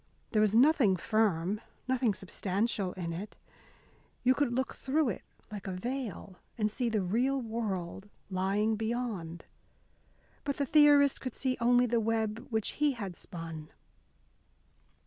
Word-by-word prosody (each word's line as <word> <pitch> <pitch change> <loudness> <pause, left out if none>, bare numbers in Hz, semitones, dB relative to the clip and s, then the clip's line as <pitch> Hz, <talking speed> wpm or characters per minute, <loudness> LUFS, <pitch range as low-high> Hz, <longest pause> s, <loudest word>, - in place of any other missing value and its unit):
There 215 - +3
was 215 0 +3
nothing 245 - +5
firm, 205 -1 +1 0.3
nothing 250 -5 +2
substantial 195 +1 -1
in 170 -3 -4
it. 200 +5 -7 0.9
You 255 +1 +5
could 275 -2 +1
look 260 +2 -1
through 280 0 0
it 195 - -4 0.3
like 205 -2 -6
a - - -2
veil 210 -2 -5 0.2
and 210 -2 +1
see 240 +2 -1
the 215 -3 0
real 245 +9 +1
world 205 -5 -4 0.2
lying 200 +4 +1
beyond. 220 -8 -3 1.0
But 280 -2 -2
the 280 - +1
theorist 290 -1 +5
could 255 - -5
see 260 -1 0
only 245 +1 +5
the 235 -1 +1
web 220 0 -1
which 220 -3 0
he 295 -2 +4
had 200 -7 -6
spun. 165 -3 -7
220 Hz, 140 wpm, -31 LUFS, 190-250 Hz, 1.0 s, nothing